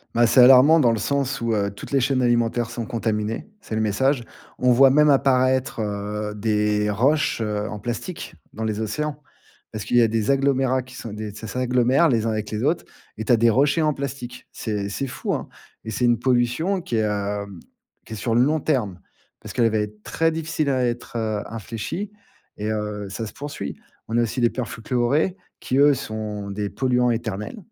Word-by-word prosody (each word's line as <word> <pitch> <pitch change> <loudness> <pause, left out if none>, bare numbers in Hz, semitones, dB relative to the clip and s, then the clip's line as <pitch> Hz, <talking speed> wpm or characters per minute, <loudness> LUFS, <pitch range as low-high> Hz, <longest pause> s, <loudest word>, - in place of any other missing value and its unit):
Bah, 120 +1 +5
c'est 120 - +4
alarmant 135 +6 +8
dans 125 -6 +4
le 115 - 0
sens 140 -1 -1
où, 115 -1 0
heu, 100 -2 +1
toutes 100 - -10
les 140 - +3
chaînes 135 0 +1
alimentaires 120 -1 +1
sont 115 - -4
contaminées. 110 0 -2 0.2
C'est 110 - -5
le 110 - 0
message. 120 +5 +1 0.3
On 125 0 +3
voit 135 +3 +7
même 150 +3 +5
apparaître, 130 -3 +2
heu, 105 0 -3
des 105 0 +1
roches, 130 +6 +1
heu, 105 -1 -2
en 105 - -6
plastique 120 - -5 0.2
dans 110 - -5
les 110 -1 -2
océans. 145 +7 -3 0.5
Parce 110 -1 -5
qu'il 120 +3 +1
y - - +7
a 115 - +5
des 110 +2 0
agglomérats 135 -1 +2
qui 130 +1 -13
sont 115 - -7
des 105 0 -5
ça 110 - -8
s'agglomèrent 125 +6 +2
les 115 -6 +1
uns 115 - +1
avec 110 -1 -3
les 110 +1 -2
autres. 155 +5 +1 0.3
Et 110 - -4
tu 120 - +4
as - - +5
des 115 +1 +4
rochers 140 +7 +3
en 155 -1 +2
plastique. 135 -3 -6
C'est 105 -3 -3
c'est 135 +7 -3
fou, 125 - -3
hein? - - -4 0.3
Et 110 - -6
c'est 125 +3 0
une 120 -1 +4
pollution 130 +10 +1
qui 125 - -4
est, 110 - +2
heu, 100 -1 -2 0.6
qui - - -9
est - - -4
sur 115 +2 -2
le 120 - +4
long 150 +5 +2
terme. 110 - -1 0.4
Parce - - -9
qu'elle 120 -3 +3
va 110 - 0
être 105 0 -5
très 165 +1 +1
difficile 160 -2 -2
à 130 -2 +1
être, 120 0 -3
heu, 110 -2 -1
infléchie 115 - -5 0.5
et, 105 +1 -2
heu, 105 -1 -3
ça 110 +3 -4
se - - -10
poursuit. 145 +1 -6 0.3
On 115 - -1
a - - +4
aussi 115 +3 -3
des 120 - +4
perfluorés 125 - -1 0.2
qui 130 - -1
eux 145 +1 +6
sont 110 -5 -5
des 100 0 -3
polluants 125 0 +1
éternels. 110 - -4
120 Hz, 210 wpm, -23 LUFS, 105-135 Hz, 0.6 s, alarmant